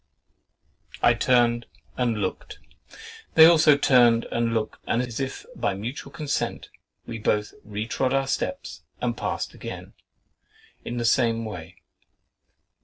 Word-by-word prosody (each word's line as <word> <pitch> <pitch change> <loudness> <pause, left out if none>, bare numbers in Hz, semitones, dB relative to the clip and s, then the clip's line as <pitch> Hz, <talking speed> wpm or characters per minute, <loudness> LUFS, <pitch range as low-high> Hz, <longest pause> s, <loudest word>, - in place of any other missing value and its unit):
I 120 - +6
turned 120 -1 +2 0.3
and 120 -3 0
looked—they 445 - -1
also 160 -3 +6
turned 120 -4 +4
and 115 0 0
looked 110 -1 -2
and 115 - +1
as 125 -1 -3
if 135 -1 -4
by 120 -5 -1
mutual 120 +7 -6
consent, 140 0 -3 0.4
we 115 -1 -6
both 105 0 0
retrod 110 +5 -2
our 135 0 +1
steps 275 - -3 0.2
and - - -1
passed - - -3
again, - - -8 0.9
in 120 - -5
the 120 - -1
same 115 -1 +2
way. 90 -4 -8
120 Hz, 120 wpm, -25 LUFS, 115-135 Hz, 0.9 s, I